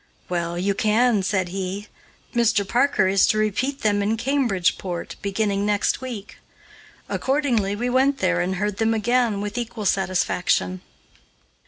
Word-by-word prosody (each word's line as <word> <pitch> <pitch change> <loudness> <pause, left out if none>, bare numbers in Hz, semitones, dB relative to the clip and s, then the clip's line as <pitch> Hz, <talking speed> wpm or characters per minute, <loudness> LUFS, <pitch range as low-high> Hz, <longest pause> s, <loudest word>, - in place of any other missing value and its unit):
"Well, 170 -1 -2
you 195 +3 +1
can," 215 +2 +2
said 190 -2 0
he, 195 +2 -4 0.5
"Mr. 230 -4 +2
Parker 245 -5 +2
is 195 0 +4
to 215 - +2
repeat 235 +7 -1
them 205 -1 +2
in 215 +3 0
Cambridgeport, 195 -9 -1
beginning 200 0 -1
next 205 +3 +1
week." 235 -6 -7 0.7
Accordingly 250 -8 0
we 240 +4 -2
went 265 +2 +2
there 180 -5 +1
and 185 +2 -1
heard 205 +1 -2
them 225 0 +1
again 230 -1 +1
with 210 +4 -3
equal 230 -2 -5
satisfaction. 180 - 0
205 Hz, 140 wpm, -23 LUFS, 190-235 Hz, 0.7 s, is